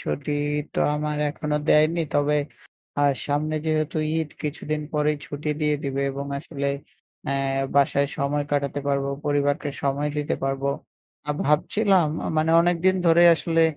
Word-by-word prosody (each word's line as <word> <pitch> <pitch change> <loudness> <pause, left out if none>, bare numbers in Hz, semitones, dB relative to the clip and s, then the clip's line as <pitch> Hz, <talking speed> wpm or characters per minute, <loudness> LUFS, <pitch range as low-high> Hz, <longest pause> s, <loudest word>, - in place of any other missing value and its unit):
ছুটি 145 +1 -3 0.4
তো - - -3 0.2
আমার 150 0 -2
এখনো 150 0 -2
দেয়নি। 155 +3 +4
তবে 145 +1 +2 0.6
আ - - +2 0.3
সামনে 150 +2 -1
যেহেতু 155 0 0 0.2
ঈদ, 160 -2 -1
কিছুদিন 150 0 -3
পরেই 150 0 +1
ছুটি 150 +1 -5
দিয়ে 150 -1 +2
দিবে 140 0 -1
এবং 140 +1 -5
আসলে 140 -1 -5 0.6
অ্যা 140 - -1 0.4
বাসায় 140 0 +3
সময় 145 +1 0
কাটাতে 140 0 0
পারবো, 140 0 0 0.2
পরিবারকে 145 +1 +1
সময় 140 +1 0
দিতে 150 0 -1
পারবো। 135 0 -1 0.6
আর 150 - -1
ভাবছিলাম 185 +4 +3 0.3
মানে 155 +1 +2
অনেকদিন 175 +2 +3
ধরেই 170 +1 +7
আসলে 165 0 +1
150 Hz, 140 wpm, -24 LUFS, 140-155 Hz, 0.6 s, ধরেই